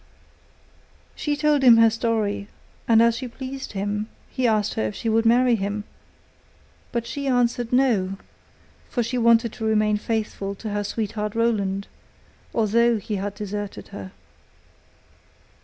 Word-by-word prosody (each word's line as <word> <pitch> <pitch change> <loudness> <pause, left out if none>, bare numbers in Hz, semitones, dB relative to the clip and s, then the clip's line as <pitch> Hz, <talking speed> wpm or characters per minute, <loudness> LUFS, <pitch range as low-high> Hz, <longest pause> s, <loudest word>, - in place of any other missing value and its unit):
She 295 -1 -1
told 300 -1 +2
him 245 -3 +8
her 225 0 +6
story, 220 -3 -1 0.4
and 230 -1 +6
as 230 0 +3
she 255 - -5
pleased 265 +2 -7
him 205 +2 -2 0.2
he 255 -1 +1
asked 215 -2 +1
her 110 - -1
if 105 - -6
she 225 - -2
would 225 +1 +3
marry 245 +1 +4
him, 205 -1 -1 1.1
but 235 -1 -2
she 275 +4 -4
answered: 245 -2 +1
'No,' 220 -8 +2 0.7
for 240 - 0
she 245 +2 -2
wanted 230 -1 +4
to 230 - -7
remain 215 -1 +2
faithful 210 -2 -3
to 215 +2 -6
her 205 0 -1
sweetheart 210 0 -3
Roland, 200 -4 0 0.7
although 230 +1 +3
he 210 0 -4
had 200 +1 -4
deserted 205 -1 -6
her. 95 -2 -8
225 Hz, 140 wpm, -24 LUFS, 205-235 Hz, 1.1 s, him